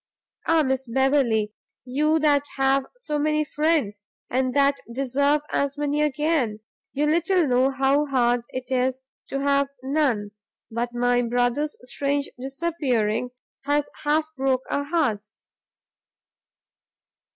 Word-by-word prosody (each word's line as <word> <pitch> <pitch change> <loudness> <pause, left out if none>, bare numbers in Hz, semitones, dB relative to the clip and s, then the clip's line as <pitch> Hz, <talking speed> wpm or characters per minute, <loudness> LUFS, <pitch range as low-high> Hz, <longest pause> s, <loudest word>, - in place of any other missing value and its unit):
Ah, 320 -1 +4
Miss 265 -1 -1
Beverley! 235 -4 +2 0.3
you 300 +5 +2
that 295 -2 +3
have 270 0 +2
so 300 -12 -3
many 305 +1 +1
friends, 295 -9 0 0.3
and 255 +1 0
that 280 0 +3
deserve 275 +4 +1
as 280 +1 0
many 295 0 0
again, 295 -7 0 0.3
you 290 +2 0
little 335 +2 +2
know 255 +1 +3
what 270 -1 -8
a 275 +2 +3
hard 245 -2 +2
thing 255 - -5
it - - -17
is 255 +1 0 0.3
to 275 - -3
have 280 0 +2 0.2
none! 265 -7 0 0.4
but 235 +1 -2
my 245 0 +2
brother's 245 +5 0
strange 280 +2 -1
disappearing 260 -6 -1 0.4
has 290 0 0
half 305 +1 +2
broke 265 -1 0
our 285 - 0
hearts!" 235 -10 -2
275 Hz, 130 wpm, -24 LUFS, 250-295 Hz, 0.4 s, Ah